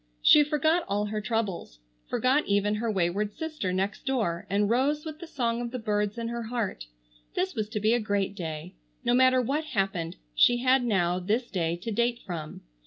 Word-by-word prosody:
She 300 - +8
forgot 315 +3 +2
all 205 +1 0
her 210 0 -3
troubles; 205 - -2 0.3
forgot 265 +4 +2
even 205 +1 +2
her 225 +2 -1
wayward 200 +2 0
sister 310 -12 -3
next 195 +3 -2
door; 210 -9 -1
and 200 +2 +2
rose 275 +7 +1
with 310 -1 -7
the 340 - -8
song 235 -5 -1
of 240 - -3
the 255 - -4
birds 210 -2 -1
in 230 0 -3
her 235 0 -3
heart. 225 - -3 0.5
This 190 - 0
was 215 -1 -3
to 215 - -2
be 215 +2 +3
a 240 - +3
great 200 -3 -1
day. 165 -2 -6 0.3
No 240 - +3
matter 255 +1 +5
what 285 +6 0
happened 195 - -2 0.2
she 240 - +5
had 255 +1 +3
now 180 -6 +1
this 220 +7 -1
day 170 -4 0
to 185 +6 -5
date 235 +2 +1
from. 165 -5 -6
215 Hz, 195 wpm, -28 LUFS, 195-250 Hz, 0.5 s, She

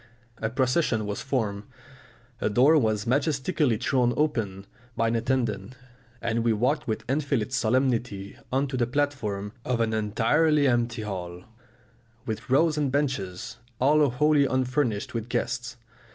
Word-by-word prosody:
A 110 - -1
procession 125 -2 +1
was 105 0 -4
formed, 110 -7 -1 0.8
a - - 0
door 130 +9 +5
was 110 -7 +1
majestically 140 0 +1
thrown 120 +1 +1
open 110 -11 -1 0.3
by 115 0 +2
an 115 - 0
attendant, 115 -2 -1 0.5
and 115 0 0
we 115 -1 +3
walked 135 +8 0
with 110 - -3
infinite 135 -4 -1
solemnity 120 -5 0 0.2
on 135 +2 +2
to 130 - -3
the 120 -2 +1
platform 120 -8 -2
of 125 -2 -1
an 115 -1 +1
entirely 140 +8 +2
empty 120 -2 0
hall, 90 -3 -6 0.8
with 110 +4 -5
rows 150 +3 +3
of 140 -3 0
benches 115 -7 -2 0.2
all 145 +2 +4
wholly 145 +3 +3
unfurnished 130 -4 0
with 115 0 -4
guests. 125 +1 -2
125 Hz, 140 wpm, -26 LUFS, 110-140 Hz, 0.8 s, door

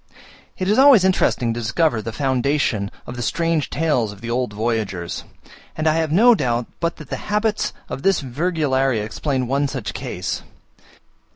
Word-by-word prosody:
It 185 - -2
is 210 +5 +3
always 270 -8 +7
interesting 130 -10 +2
to 120 - -4
discover 120 +2 +1
the 115 - -5
foundation 130 -4 0 0.2
of 125 - -7
the 120 - -5
strange 165 +3 0
tales 140 -9 0
of 105 - -12
the 115 +2 -5
old 125 -2 -1
voyagers; 105 -5 -2 0.5
and 155 0 -1
I 155 - +4
have 160 -2 0
no 230 +9 +6
doubt 120 - 0
but 170 0 -1
that 155 -4 -12
the - - -1
habits 210 +1 0 0.2
of 135 - -5
this 195 +2 +3
Virgularia 135 -4 0
explain 130 +3 -2
one 140 +3 +1
such 135 -4 -5
case. - - -4
135 Hz, 170 wpm, -21 LUFS, 120-165 Hz, 0.5 s, always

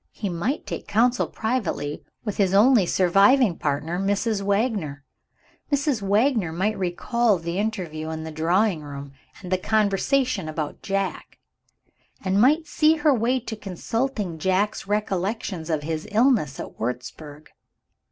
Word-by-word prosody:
He 205 - -4
might 200 - -2
take - - -6
counsel 240 +4 +2
privately 210 - -2 0.2
with 210 - -3
his 195 -2 +2
only 215 -2 +5
surviving 195 +5 +4
partner, 150 +4 -2
Mrs. 200 +2 0
Wagner. 200 - -1 0.7
Mrs. 280 -4 +1
Wagner 210 - +2
might 195 +6 0
recall 205 +4 +1
the 170 +2 -3
interview 175 -8 -3
in 160 0 -4
the 160 - -6
drawing 170 +3 +1
room, 140 -1 -8 0.3
and 180 - -7
the 185 - +2
conversation 215 - +1
about 155 -1 -4
Jack; 195 -1 -3 0.9
and 195 +1 +2
might 305 +6 +4
see 315 0 +3
her 300 -1 +3
way 250 +2 +1
to 220 -1 -6
consulting 210 -1 -3
Jack's 190 +3 0
recollections 200 -3 -2
of 155 -2 -1
his 160 0 -3
illness 215 - +2
at - - -8
Wurzburg. 145 +5 -6
195 Hz, 135 wpm, -24 LUFS, 165-225 Hz, 0.9 s, only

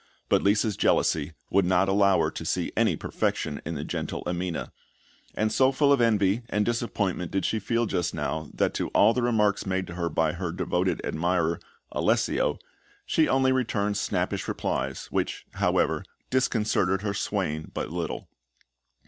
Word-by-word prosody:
But - - +4
Lisa's 105 +1 +2
jealousy 75 0 +2 0.2
would 100 +1 +4
not 95 +2 +3
allow 100 0 +4
her - - +1
to - - -6
see - - -1
any - - +3
perfection 75 -3 -2
in 85 - -3
the 75 - -4
gentle - - -4
Amina; 90 -1 -3 0.6
and 110 0 +1
so 130 +3 +4
full 140 +1 +4
of 135 - +2
envy 105 -1 +3
and 105 0 +1
disappointment 100 -7 -1
did 95 -2 -1
she 110 - 0
feel 115 +3 0
just 90 -5 -1
now 75 0 -3
that - - +1
to - - -1
all 110 +3 +6
the 125 - 0
remarks 105 -5 +1
made 95 0 0
to 90 - -8
her 85 -1 -2
by 80 0 +1
her 85 -1 -3
devoted 90 +1 -1
admirer, 85 0 0 0.3
Alessio, - - +1 0.5
she 160 - +2
only 130 0 +3
returned 110 -5 0
snappish 100 - -1
replies, 65 0 -2
which, - - -2
however, - - +1 0.3
disconcerted 105 -6 +1
her 100 -2 -1
swain 85 -7 -2
but - - -4
little. 85 -1 -4
95 Hz, 165 wpm, -27 LUFS, 85-110 Hz, 0.6 s, all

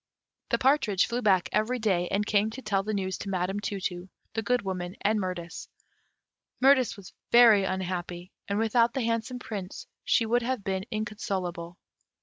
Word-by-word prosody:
The - - +2
partridge 260 -8 +3
flew 240 +1 -2
back 190 -5 +3
every 220 +5 +1
day, 190 -6 +1
and 205 +3 0
came 210 0 +2
to 250 +4 -8
tell 195 -3 +1
the 210 +2 -4
news 190 -1 -2
to 200 - -5
Madame 190 +1 -1
Tu 200 0 -3
tu, 180 0 -4 0.2
the 225 - -1
Good 245 +2 0
Woman, 180 -1 -4
and 215 +1 +2
Mirtis. 180 -3 -5 0.9
Mirtis 260 -3 +4
was 195 -2 -12 0.2
very 225 -5 +7
unhappy, 180 -1 -4 0.2
and 200 - -1
without 230 +2 +2
the 265 - 0
handsome 230 +2 -1
Prince 205 -6 -7 0.2
she 230 - +2
would 240 +2 +2
have 245 -2 -2
been 190 0 -2
inconsolable. 190 -6 -4
205 Hz, 170 wpm, -28 LUFS, 185-230 Hz, 0.9 s, very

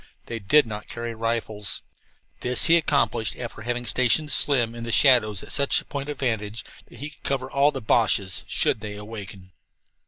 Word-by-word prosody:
They 115 - -5
did 135 +9 +4
not 105 -1 -7
carry 115 0 -5
rifles. 115 -3 -2 0.6
This 125 0 +2
he 165 - +5
accomplished 140 -9 +1
after 120 -3 -7
having 120 +1 -3
stationed 130 +5 +2
Slim 120 -5 +3
in 120 0 -7
the 115 - -4
shadows 115 -7 +4
at - - -8
such 140 -1 +3
a - - -11
point 140 0 -5
of 145 - -4
vantage 110 -4 -2 0.2
that - - -15
he 145 +5 -6
could - - -17
cover 135 -1 -2
all 140 +1 +3
of 145 - +1
the 135 - -4
Boches, 105 -4 +1
should 110 - 0
they 105 -1 -6
awaken. 100 -3 -9
115 Hz, 190 wpm, -24 LUFS, 105-135 Hz, 0.6 s, he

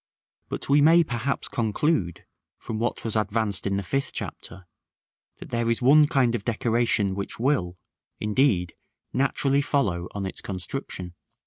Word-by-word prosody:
But - - -5
we 145 +1 +5
may 165 +3 +6
perhaps 135 -1 -2
conclude, 110 - -1 0.3
from 110 - -5
what 120 +1 -1
was 115 - -1
advanced 105 -2 0
in 100 0 0
the 100 - -2
Fifth 135 +8 -2
Chapter, 95 - -6 0.7
that - - -11
there 115 -1 0
is 115 - +1
one 145 +4 +6
kind 130 -5 +2
of 115 -4 -2
decoration 115 -3 +1
which 100 +2 -5
will, 115 -9 0 0.4
indeed, 105 -6 +1 0.4
naturally 140 +1 +1
follow 105 - 0
on 100 -1 -3
its 95 - -6
construction. 90 -2 -6
115 Hz, 145 wpm, -25 LUFS, 100-135 Hz, 0.7 s, may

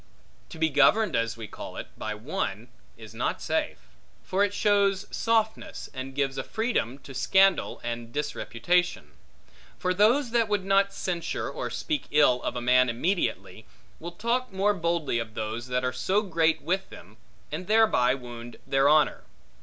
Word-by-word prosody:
To 165 - -10
be 160 0 +2
governed 215 +6 +4
(as 115 0 -1
we 115 -2 -7
call - - -9
it) - - -6
by - - -4
one - - -4 0.3
is - - -12
not - - -2
safe; - - -1 0.5
for 190 +2 +1
it 205 - +1
shows 200 -1 +2
softness, 220 -1 -1
and 135 0 -6
gives 135 -1 -1
a - - -2
freedom, 220 - -1
to 135 - -10
scandal 190 +8 +3
and 120 -1 -5
disreputation; 150 - -1 0.7
for 185 0 0
those, 230 +7 +3
that 230 -2 +2
would 205 -2 -1
not 195 0 +3
censure 175 -4 -3
or - - -4
speak 305 -3 -3
ill 130 -4 +4
of - - -3
a 120 - -3
man 125 +1 +4
immediately, 170 +11 -2 0.3
will 170 +1 -7
talk 235 +6 -1
more 195 +2 +2
boldly 170 -8 -1
of 110 -2 -6
those 110 +2 -4
that 125 0 -1
are 125 - -1
so 190 +11 +1
great 165 -4 +1
with 190 +4 -1
them, 100 +6 -14 0.3
and 170 +4 -5
thereby 210 - +4
wound 120 -2 -9
their 135 +1 +3
honor. 155 0 +3
165 Hz, 165 wpm, -27 LUFS, 125-200 Hz, 0.7 s, governed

